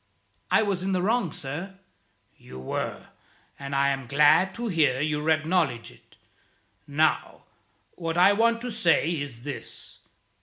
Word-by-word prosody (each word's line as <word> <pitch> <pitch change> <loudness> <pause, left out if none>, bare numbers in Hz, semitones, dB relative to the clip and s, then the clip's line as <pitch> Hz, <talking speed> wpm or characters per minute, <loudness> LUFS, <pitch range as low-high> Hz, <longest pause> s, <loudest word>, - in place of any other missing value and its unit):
"I - - +4
was 200 -3 -1
in 190 +1 -1
the 180 - +1
wrong, 220 -4 +1
sir." 175 +10 -7 0.6
"You 65 - -13
were; 65 - -5 0.5
and 140 0 -5
I 140 0 +3
am 135 -2 -3
glad 150 +8 +4
to 235 0 -4
hear 155 - +2
you 150 +1 -1
acknowledge 155 -6 0
it. - - -22 0.7
Now, 155 +2 0 0.5
what 165 -1 -4
I 180 +3 +6
want 230 +2 +2
to 245 0 -4
say 170 -6 +2
is 130 -5 -7
this. 135 -5 -9
160 Hz, 145 wpm, -26 LUFS, 140-190 Hz, 0.7 s, I